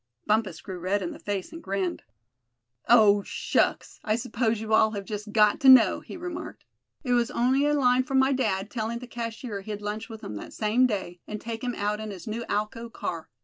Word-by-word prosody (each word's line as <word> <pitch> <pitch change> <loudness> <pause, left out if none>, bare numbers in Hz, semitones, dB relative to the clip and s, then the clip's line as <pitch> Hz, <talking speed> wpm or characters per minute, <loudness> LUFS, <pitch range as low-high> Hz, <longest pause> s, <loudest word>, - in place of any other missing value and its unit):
Bumpus 210 -5 0
grew 185 -2 -7
red 190 +3 0
in 175 - -3
the - - -10
face 200 - -4
and 330 - -8
grinned. 195 - -2 0.9
"Oh! 210 -4 +6
shucks! - - -1
I 215 - +1
s'pose 230 -1 -1
you 220 0 -3
all 220 0 +5
have 200 -1 -5
just 210 0 -6
got 210 -1 +4
to 270 - +6
know," 240 -7 +7
he - - -10
remarked. 350 -1 -7 0.4
"It 250 -3 0
was 240 0 +2
on'y 265 +4 +2
a 295 - +2
line 255 -2 +3
from 265 +1 -1
my 265 +1 +4
dad, 205 -6 -1
tellin' 230 -1 -2
the 250 - -8
cashier 230 -3 -5
he'd 210 +1 -6
lunch 210 +2 -5
with 220 -1 -9
him 105 - -6
that - - -9
same 225 +4 +2
day, 190 -6 -4
and 210 - -5
take 230 +1 -6
him 245 -1 -2
out 210 +1 -1
in 215 0 -5
his 190 -3 -8
new 230 +1 -4
Alco 215 +3 -3
car. 165 -7 -5
220 Hz, 215 wpm, -27 LUFS, 205-245 Hz, 0.9 s, know